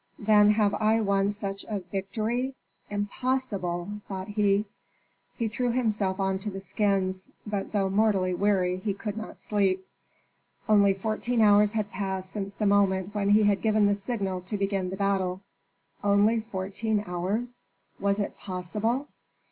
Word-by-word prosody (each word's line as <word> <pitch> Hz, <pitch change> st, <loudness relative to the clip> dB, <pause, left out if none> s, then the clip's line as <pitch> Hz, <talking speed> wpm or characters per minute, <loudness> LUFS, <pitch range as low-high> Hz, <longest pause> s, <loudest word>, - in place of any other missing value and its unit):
"Then 210 Hz, 0 st, +5 dB
have 210 Hz, -2 st, +2 dB
I 220 Hz, +1 st, +2 dB
won 200 Hz, -2 st, +2 dB
such 200 Hz, -1 st, -4 dB
a 210 Hz, -2 st, -3 dB
victory? 215 Hz, +8 st, -2 dB, 0.3 s
Impossible!" 205 Hz, -3 st, -2 dB
thought 190 Hz, 0 st, -5 dB
he. 205 Hz, 0 st, +2 dB, 0.7 s
He 230 Hz, -, -1 dB
threw 245 Hz, +3 st, -1 dB
himself 210 Hz, -6 st, 0 dB
on 190 Hz, 0 st, 0 dB
to 210 Hz, -, -3 dB
the 195 Hz, -1 st, -6 dB
skins, 190 Hz, -2 st, -1 dB, 0.2 s
but 205 Hz, -2 st, -3 dB
though 200 Hz, -2 st, +1 dB
mortally 195 Hz, -2 st, +2 dB
weary 185 Hz, -1 st, +1 dB
he 195 Hz, +1 st, -2 dB
could 205 Hz, 0 st, -5 dB
not 220 Hz, 0 st, -7 dB
sleep. 190 Hz, -3 st, +1 dB, 0.8 s
Only 200 Hz, -2 st, +5 dB
fourteen 220 Hz, +4 st, -1 dB
hours 210 Hz, 0 st, +5 dB
had 210 Hz, -2 st, -2 dB
passed 190 Hz, -2 st, -3 dB
since 200 Hz, -1 st, -5 dB
the 210 Hz, -, -1 dB
moment 200 Hz, -1 st, +2 dB
when 200 Hz, -1 st, 0 dB
he 210 Hz, +1 st, +6 dB
had 200 Hz, -2 st, +3 dB
given 215 Hz, -1 st, +3 dB
the 205 Hz, -, +4 dB
signal 200 Hz, -3 st, -3 dB
to 205 Hz, +4 st, -4 dB
begin 195 Hz, -2 st, -1 dB
the 190 Hz, -, -5 dB
battle. 190 Hz, -2 st, 0 dB, 0.6 s
Only 205 Hz, +3 st, +4 dB
fourteen 210 Hz, 0 st, -2 dB
hours? 205 Hz, +8 st, -3 dB, 0.4 s
Was 200 Hz, +1 st, +1 dB
it 200 Hz, -, -2 dB
possible! 210 Hz, +9 st, -2 dB
205 Hz, 150 wpm, -27 LUFS, 190-215 Hz, 0.8 s, he